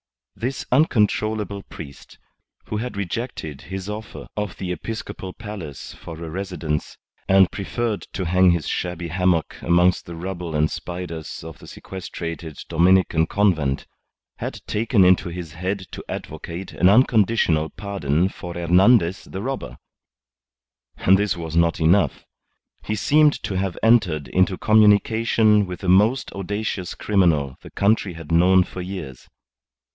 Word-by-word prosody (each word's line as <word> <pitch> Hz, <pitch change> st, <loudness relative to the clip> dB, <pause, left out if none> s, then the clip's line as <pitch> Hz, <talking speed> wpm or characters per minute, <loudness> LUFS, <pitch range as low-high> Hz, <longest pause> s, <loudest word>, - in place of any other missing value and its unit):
This 125 Hz, +4 st, -4 dB
uncontrollable 110 Hz, -, +1 dB
priest, 70 Hz, -6 st, -11 dB, 0.5 s
who 105 Hz, -, -3 dB
had 115 Hz, -1 st, -4 dB
rejected 95 Hz, -, -4 dB
his 95 Hz, 0 st, -5 dB
offer 105 Hz, +1 st, -7 dB
of 105 Hz, -4 st, -4 dB
the 90 Hz, -1 st, -4 dB
episcopal 95 Hz, 0 st, -6 dB
palace 100 Hz, -, -8 dB
for 80 Hz, -, -10 dB
a -, -, -5 dB
residence 85 Hz, -5 st, -4 dB, 0.3 s
and 95 Hz, -1 st, +5 dB
preferred 110 Hz, +2 st, -3 dB
to 95 Hz, -, -3 dB
hang 90 Hz, +2 st, +4 dB
his 85 Hz, -3 st, +1 dB
shabby 90 Hz, -1 st, -3 dB
hammock 90 Hz, -1 st, +1 dB
amongst 90 Hz, +1 st, +3 dB
the 85 Hz, -, -7 dB
rubble 85 Hz, -1 st, -5 dB
and 75 Hz, +1 st, +2 dB
spiders 85 Hz, -4 st, -6 dB
of 80 Hz, -2 st, -10 dB
the -, -, -13 dB
sequestrated 85 Hz, -4 st, -7 dB
Dominican 85 Hz, -1 st, +3 dB
Convent, 80 Hz, -10 st, +1 dB, 0.5 s
had -, -, -5 dB
taken 110 Hz, -2 st, +2 dB
into 90 Hz, -1 st, +4 dB
his 85 Hz, -3 st, -7 dB
head 95 Hz, +4 st, -3 dB
to -, -, -7 dB
advocate 85 Hz, +3 st, -6 dB
an 90 Hz, -, +4 dB
unconditional 105 Hz, -8 st, +3 dB
pardon 90 Hz, -5 st, -1 dB
for 90 Hz, -3 st, -8 dB
Hernandez 90 Hz, +2 st, +3 dB
the 95 Hz, -, -6 dB
Robber! 135 Hz, +2 st, -4 dB, 1.2 s
And 95 Hz, +1 st, +4 dB
this 105 Hz, -3 st, 0 dB
was 80 Hz, -1 st, -5 dB
not 85 Hz, 0 st, +2 dB
enough; 85 Hz, +5 st, +2 dB, 0.6 s
he 110 Hz, -, -2 dB
seemed 150 Hz, +7 st, +4 dB
to -, -, -3 dB
have 95 Hz, -1 st, -2 dB
entered 95 Hz, -, +3 dB
into 95 Hz, 0 st, +2 dB
communication 110 Hz, 0 st, +4 dB
with 90 Hz, 0 st, -7 dB
the 95 Hz, -, -1 dB
most 105 Hz, +8 st, +3 dB
audacious 100 Hz, -1 st, -4 dB
criminal 80 Hz, -10 st, +1 dB
the -, -, -11 dB
country 100 Hz, -2 st, +1 dB
had 85 Hz, -1 st, -9 dB
known 90 Hz, +2 st, +5 dB
for 90 Hz, -, -8 dB
years. 90 Hz, -9 st, -7 dB
95 Hz, 140 wpm, -22 LUFS, 85-105 Hz, 1.2 s, and